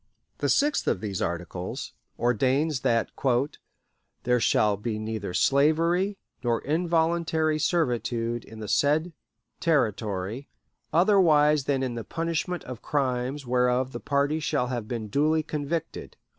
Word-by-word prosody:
The - - 0
sixth 290 +1 +2
of - - +1
these 100 -2 -4
articles 90 +1 -4 0.2
ordains 130 +5 +1
that 115 -2 +1 1.1
"there 125 0 +2
shall 105 -2 +3
be 105 +2 -3
neither 110 -3 -4
slavery 165 +8 +2 0.3
nor 120 -1 +1
involuntary 160 -1 +1
servitude 120 -7 0
in 110 - -12
the 105 - -5
said 155 - +2 0.5
Territory, 110 - -1 0.4
otherwise 155 -6 +4
than 135 -2 0
in 130 -2 -2
the 115 -1 -5
punishment 165 - -2
of 125 -3 -8
crimes 135 0 -1
whereof 125 +1 +1
the - - -6
party 140 +2 0
shall 125 -5 -1
have 120 -4 -3
been 115 -2 -4
duly 155 +7 +2
convicted." 155 +2 -4
135 Hz, 125 wpm, -26 LUFS, 115-160 Hz, 1.1 s, otherwise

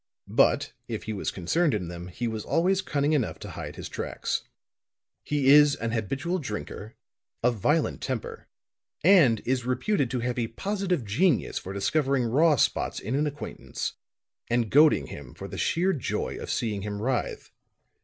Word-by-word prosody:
But, - - +3
if - - -4
he 110 - -4
was 100 - -2
concerned 145 - +1
in 90 -4 -3
them, 85 +1 -7
he 115 +7 -4
was 110 -2 -3
always 185 +3 +2
cunning 145 -4 0
enough 135 -7 0
to - - -8
hide - - -7
his - - -6
tracks. - - -3 0.8
"He 145 -2 +1
is 145 0 +7
an 115 0 -3
habitual 135 - -1
drinker, 105 -4 -6 0.5
of 120 -1 +2
violent 150 - +1
temper, 130 -5 -4 0.6
and 155 - +6
is 130 0 0
reputed 130 - 0
to 125 0 -2
have 125 +1 -1
a 115 - 0
positive 185 - -2
genius 145 - +1
for 95 - -8
discovering 135 +6 +1
raw 145 +7 +4
spots 120 - +1
in 110 - -4
an 150 +2 +1
acquaintance 145 0 -5 0.6
and 120 -2 +1
goading 150 +2 +6
him 70 -4 -10
for - - -7
the - - -7
sheer 185 +3 +2
joy 135 - -2
of - - -7
seeing 105 -4 -1
him 105 0 -4
writhe. 125 +3 -2
130 Hz, 165 wpm, -27 LUFS, 110-155 Hz, 0.8 s, is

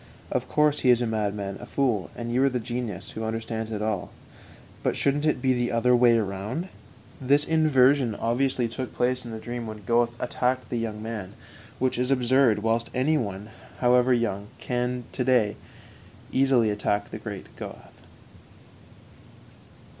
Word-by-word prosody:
"Of - - -1
course 150 -1 +3
he 130 - +2
is 125 0 +5
a - - +1
madman, 105 -3 -2
a 120 - -9
fool, 120 -9 0
and 120 0 -4
you 130 +2 +3
are 140 - +4
the 125 -1 -2
genius 115 -5 -4
who 110 - -5
understands 110 0 -3
all 110 - -2
about 105 -5 -1
it. - - -16 0.7
But - - 0
shouldn't 145 +2 +1
it 140 -5 0
be 130 -1 +4
the 120 -1 0
other 120 +2 +3
way 120 -1 +5
round?" 110 - -3 0.5
This 140 +3 +3
inversion 140 -6 +3
obviously 120 +2 0
took 125 +2 -6
place 125 +1 0
in - - -7
the 110 - -5
dream 120 +1 -5
when 110 -1 -8
Goethe 120 +1 +2
attacked 125 +1 -1
the 120 - 0
young 110 -2 -4
man, 110 -4 -5 0.4
which 130 -1 0
is 125 +1 0
absurd, 125 -4 +3
whilst 115 +1 +1
any 150 +5 +2
one, 100 -1 -5 0.3
however 125 +1 +4
young, 105 -5 0
can 125 0 -2
to 125 - -2
day 120 -5 +3 0.8
easily 130 -5 +3
attack 105 0 -1
the - - -6
great - - -8
Goethe. - - -10
120 Hz, 170 wpm, -26 LUFS, 110-130 Hz, 0.8 s, is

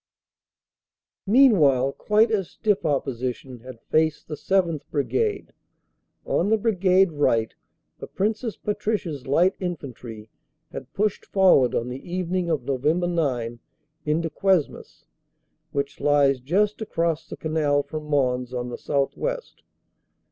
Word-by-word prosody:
Meanwhile 165 - +5
quite 215 +8 +2
as 195 -5 0
stiff 205 -6 0
opposition 130 -2 -3
had 125 0 -11
faced 155 -1 0
the 155 - -6
7th. 170 -1 0
Brigade. 415 - -1 0.7
On 185 - 0
the 220 - +4
Brigade 195 -4 +3
right 115 -7 +1 0.5
the - - -7
Princess 220 +3 -2
Patricias 205 - -3
Light 175 +7 +3
Infantry 125 - -7 0.4
had - - -8
pushed 210 0 0
forward 180 - +4
on 120 - -1
the 130 +2 -6
evening 180 0 -1
of 160 -3 0
Nov. 135 -3 -2
9 150 -8 0 0.4
into 160 +2 -1
Cuesmes, 185 -2 -1 0.7
which 140 0 -3
lies 140 -2 +3
just 200 - 0
across 165 -6 -2
the - - -7
canal 150 -2 0
from 155 0 -7
Mons 125 -4 0
on 125 0 -3
the 120 - -7
southwest. 485 - -2
155 Hz, 120 wpm, -24 LUFS, 135-195 Hz, 0.7 s, Meanwhile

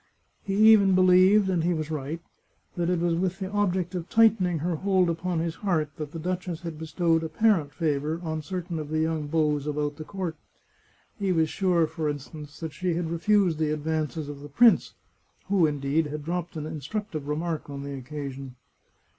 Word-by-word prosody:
He 195 -1 -3 0.2
even 200 -3 +5
believed, 185 +2 +5
and 180 -4 +1
he 175 +1 +1
was 155 0 -4
right, 150 +2 -3 0.6
that 175 -1 0
it 180 - +2
was 170 0 +1
with 180 +2 -1
the 190 -1 -5
object 190 -3 0
of 175 -2 -5
tightening 210 -6 +4
her 165 +2 -1
hold 190 -1 +2
upon 175 +1 -2
his 165 0 -1
heart 160 -7 0
that 150 -2 -5
the 165 - -7
duchess 180 0 -3
had 165 -3 -6
bestowed 165 0 +1
apparent 160 -2 +2
favour 150 0 -1
on 160 -1 -3
certain 175 0 -4
of 150 -1 -6
the 155 - -1
young 160 -1 0
beaux 150 -1 +1
about 145 0 -2
the 155 - -6
court. 180 -2 -5 0.8
He 195 -2 0
was 160 -3 +2
sure, 180 -4 +2
for 155 -1 -3
instance, 145 +1 -7
that 160 -2 -5
she 175 +2 -1
had 165 -1 -2
refused 175 -1 +2
the 155 -1 +1
advances 155 0 -2
of 145 -1 -7
the 145 +1 -10
prince, 230 - +4 0.5
who, 190 -5 +4
indeed, 145 +2 0
had 150 0 -6
dropped 175 0 -3
an 150 - -4
instructive 155 +1 -5
remark 160 +1 -3
on 140 -1 -6
the 140 0 -5
occasion. 135 -1 -7
165 Hz, 190 wpm, -26 LUFS, 150-180 Hz, 0.8 s, even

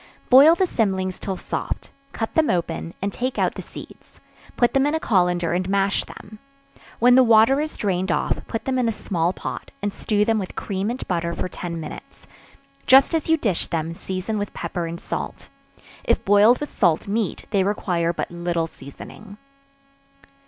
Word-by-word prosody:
Boil 285 +6 +8
the 375 - +2
cymlings 190 - -1
till 190 -2 -4
soft; - - -5 0.2
cut 225 - -4
them 320 -2 +3
open, 170 -1 -2
and 200 0 -1
take 255 +1 -3
out - - +1
the - - -7
seeds; - - -13 0.4
put 240 - +3
them 275 +1 +3
in 295 - 0
a - - 0
colander, 175 - +1
and 180 +1 -1
mash 195 0 +1
them; 210 +1 -12 0.6
when 245 +2 +5
the 260 +1 +7
water 230 +4 +5
is 310 0 -5
drained 190 -2 -1
off, - - 0
put 225 - -4
them 260 -1 0
in 240 -2 +2
a - - +1
small 175 -5 -1
pot, - - -6
and 205 0 -3
stew 210 0 0
them 225 -1 +2
with 190 - -6
cream 195 +1 -3
and 250 +2 -5
butter 170 -1 -1
for - - -3
ten 170 -2 -6
minutes; 155 - -10 0.6
just 265 +5 +6
as 325 -1 -1
you 320 - +5
dish 210 - -1
them, 165 0 -2
season 190 +5 -4
with 205 - -5
pepper 175 -2 -3
and 170 +1 -6
salt. - - -6 0.5
If - - +1
boiled 205 +5 +6
with 295 - -7
salt 170 -3 +2
meat, 210 0 -2
they 195 -2 +2
require 180 -4 0
but 170 - -4
little 170 -1 -1
seasoning. 200 +7 -12
200 Hz, 185 wpm, -23 LUFS, 175-235 Hz, 0.6 s, Boil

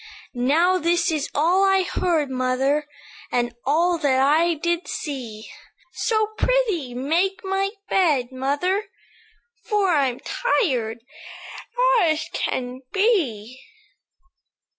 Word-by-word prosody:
"Now 320 +9 +2
this 345 +1 +1
is 300 -2 -2
all 345 +6 +3
I 385 -1 +3
heard, 330 -6 0
mother, 260 +3 0 0.4
And 240 -1 0
all 335 +4 +2
that 270 -4 +2
I 315 +5 +3
did 340 +3 -2
see; 240 -8 -6 0.5
So, 435 -2 0
pr'ythee, 415 - 0
make 345 +9 0
my 390 0 0 0.2
bed, 290 -10 +2
mother, 290 +10 -1 0.8
For 415 -3 +1
I'm 270 -5 +1
tired 245 - -1 1.0
as 315 -2 +1
I - - -2
can 250 0 -3
be." 265 - 0
310 Hz, 105 wpm, -23 LUFS, 260-370 Hz, 1.0 s, all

